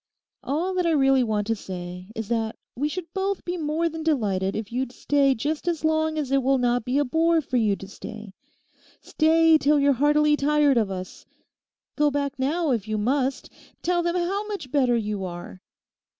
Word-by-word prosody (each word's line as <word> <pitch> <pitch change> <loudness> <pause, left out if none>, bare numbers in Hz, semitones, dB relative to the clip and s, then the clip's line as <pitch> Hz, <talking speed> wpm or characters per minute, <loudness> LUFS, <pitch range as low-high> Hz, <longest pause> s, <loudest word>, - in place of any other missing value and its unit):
All 330 +7 -1
that 360 -2 0
I 330 - +2
really 270 -2 +4
want 215 -3 -1
to 225 +1 0
say 180 -2 -7
is 225 -2 -4
that 225 -2 -1 0.2
we 290 +4 -1
should 340 0 -6
both 390 0 -2
be 355 - -2
more 320 0 -1
than 325 0 -5
delighted 205 -11 0
if 215 -1 -5
you'd 255 +1 -2
stay 275 +1 +2
just 300 +8 -3
as 330 -2 -1
long 315 0 +1
as 285 -4 -2
it 275 0 +3
will 270 +1 +2
not 245 -2 +1
be 255 +2 0
a 290 - +2
bore 325 +5 +2
for 260 -4 -2
you 215 -4 +2
to 195 - -10
stay. 215 0 -9 0.7
Stay 320 0 +3
till 295 +1 +3
you're 280 0 +4
heartily 295 +3 +3
tired 295 -2 +3
of 215 -4 +2
us. 185 -1 -7 0.7
Go 300 0 +3
back 280 -1 -2
now, 305 +3 0
if 225 -4 -1
you 215 0 -1
must; 260 +5 -1 0.3
tell 350 0 +1
them 345 0 -1
how 385 +4 -1
much 400 -12 -6
better 255 -5 +3
you 210 -3 -3
are. 180 +1 -8
275 Hz, 195 wpm, -24 LUFS, 225-315 Hz, 0.7 s, really